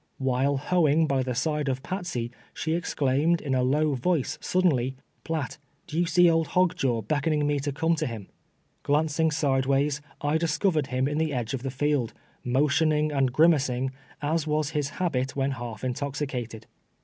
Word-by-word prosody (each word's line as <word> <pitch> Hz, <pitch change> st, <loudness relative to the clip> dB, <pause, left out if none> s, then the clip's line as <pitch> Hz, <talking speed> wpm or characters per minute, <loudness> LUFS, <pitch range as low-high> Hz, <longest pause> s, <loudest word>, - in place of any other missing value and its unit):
"While 135 Hz, +1 st, +1 dB
hoeing 160 Hz, +1 st, +3 dB
by 135 Hz, -3 st, +1 dB
the 125 Hz, -1 st, -2 dB
side 150 Hz, +2 st, 0 dB
of 130 Hz, 0 st, -2 dB
Patsey, 175 Hz, -11 st, -3 dB, 0.2 s
she 160 Hz, -, -1 dB
ex 175 Hz, +1 st, -3 dB
claimed, 145 Hz, +5 st, +2 dB
in 140 Hz, -3 st, -3 dB
a 130 Hz, -, +2 dB
low 145 Hz, +4 st, +2 dB
voice, 140 Hz, +2 st, 0 dB
suddenly, 135 Hz, -9 st, +1 dB, 0.2 s
" -, -, -42 dB
Piatt, 160 Hz, -5 st, -3 dB, 0.3 s
d'ye 170 Hz, +2 st, 0 dB
see 175 Hz, +1 st, +5 dB
old 165 Hz, -1 st, +3 dB
Hog 180 Hz, -1 st, +4 dB
Jaw 120 Hz, -9 st, 0 dB
beckoning 150 Hz, +5 st, 0 dB
me 145 Hz, -1 st, +1 dB
to 145 Hz, +1 st, -2 dB
come 160 Hz, +4 st, +1 dB
to 155 Hz, -, -1 dB
him 110 Hz, -5 st, -7 dB, 0.3 s
?" -, -, -43 dB
Glancing 155 Hz, +2 st, +1 dB
sideways, 140 Hz, -1 st, +1 dB, 0.2 s
I 145 Hz, +2 st, +1 dB
discovered 160 Hz, -2 st, +1 dB
him 130 Hz, 0 st, 0 dB
in 150 Hz, +1 st, -1 dB
the 160 Hz, -1 st, 0 dB
edge 120 Hz, 0 st, -2 dB
of 130 Hz, -, -3 dB
the 135 Hz, -, -3 dB
field, 135 Hz, -2 st, 0 dB, 0.3 s
motioning 150 Hz, +4 st, +2 dB
and 135 Hz, -3 st, +1 dB
grimacing, 135 Hz, -4 st, +3 dB, 0.3 s
as 155 Hz, +1 st, 0 dB
was 150 Hz, 0 st, 0 dB
his 150 Hz, -2 st, -1 dB
habit 130 Hz, -8 st, -1 dB
when 135 Hz, 0 st, 0 dB
half 120 Hz, -4 st, -6 dB
intoxicated. 130 Hz, -4 st, -3 dB
145 Hz, 175 wpm, -26 LUFS, 130-160 Hz, 0.3 s, see